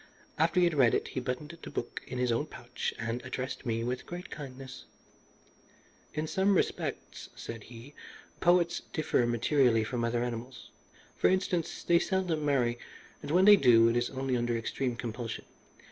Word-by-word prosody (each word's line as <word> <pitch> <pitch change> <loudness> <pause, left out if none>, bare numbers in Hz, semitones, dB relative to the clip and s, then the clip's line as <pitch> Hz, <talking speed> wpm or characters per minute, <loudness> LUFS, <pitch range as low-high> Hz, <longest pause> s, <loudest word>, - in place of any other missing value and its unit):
After 170 +3 +3
he - - +5
had 170 -1 +3
read 130 -6 +4
it - - -1
he - - -3
buttoned 130 +6 -4
the - - -8
book 120 - -4
in 125 - -5
his 125 -1 +1
own 115 - 0
pouch - - -5
and 115 +2 -3
addressed 130 0 -5
me 115 0 0
with 125 +1 -3
great 175 +1 -7
kindness 135 -2 -8 1.3
"In 155 +1 -1
some 190 +5 +2
respects," - - -2
said 115 -2 -8
he, 120 +4 -12 0.5
"poets 175 -1 +3
differ 145 -6 +1
materially 120 -1 +3
from 120 +2 -2
other 120 0 0
animals. 120 +1 -6 0.4
For - - +3
instance, 180 -3 -1
they 170 0 +4
seldom 180 -5 0
marry, 125 -5 +1 0.4
and 145 - -7
when 180 +5 +4
they 210 0 +10
do 115 -6 +6
it 115 - 0
is 120 0 +1
only 135 -1 -2
under 120 -1 0
extreme 120 +2 -2
compulsion. 115 0 -5
130 Hz, 170 wpm, -30 LUFS, 120-160 Hz, 1.3 s, they